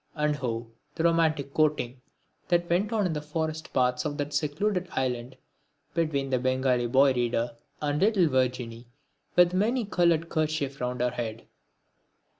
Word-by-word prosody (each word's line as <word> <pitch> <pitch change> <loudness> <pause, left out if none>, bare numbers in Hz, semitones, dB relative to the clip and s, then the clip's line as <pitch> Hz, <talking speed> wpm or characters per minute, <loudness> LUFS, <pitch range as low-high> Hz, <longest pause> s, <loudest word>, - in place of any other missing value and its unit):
And 150 -1 0
oh! 115 -2 -3 0.2
the 165 - -1
romantic 160 -4 +2
courting 145 -5 +1 0.5
that 175 -1 +2
went 185 +6 +1
on 215 -3 +1
in 175 - 0
the 150 - -3
forest 155 +1 -3
paths 125 -1 +1
of 145 -1 -3
that 145 -1 -3
secluded 175 +6 0
island, 125 0 -2 0.6
between 140 -5 0
the 130 - +2
Bengali 130 -1 +1
boy 135 +2 +5
reader 120 -1 -1 0.3
and 145 0 0
little 200 -4 +4
Virginie 125 -3 -1 0.5
with 175 0 +6
the 185 - -1
many 230 +4 +1
coloured 170 -4 +2
kerchief 155 -4 -1
round 125 0 -2
her 125 0 +2
head! 115 -2 -5
145 Hz, 155 wpm, -27 LUFS, 125-165 Hz, 0.6 s, with